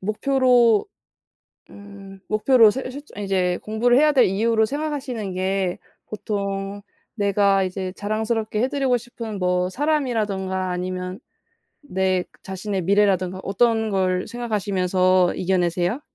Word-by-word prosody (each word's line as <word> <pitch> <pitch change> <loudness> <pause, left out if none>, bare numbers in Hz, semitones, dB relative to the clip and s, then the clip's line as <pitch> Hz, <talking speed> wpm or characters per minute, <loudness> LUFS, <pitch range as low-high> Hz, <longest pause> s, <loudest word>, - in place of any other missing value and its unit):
목표로 240 - +3 0.8
음 200 -1 -12
목표로 220 0 +5
세우실 265 +3 -6
저 - - -9
이제 185 -2 0
공부를 240 +3 +2
해야 300 +1 +5
될 265 -4 +5
이유로 220 +3 +2
생각하시는 270 -8 -4
게 190 -1 -1 0.3
보통 200 -1 -4 0.3
내가 200 -1 +2
이제 185 0 -4
자랑스럽게 215 +1 -2
해 255 - +2
드리고 270 -3 +1
싶은 230 -3 -7
뭐 180 0 +1
사람이라든가 210 -9 -1
아니면 180 +1 -4 0.6
내 190 -7 0 0.2
자신의 190 0 -4
미래라든가 190 -1 +1
어떤 220 +2 +1
걸 185 -2 0
생각하시면서 185 -5 +1
이겨내세요? 180 - 0
200 Hz, 290 characters per minute, -22 LUFS, 185-235 Hz, 0.8 s, 목표로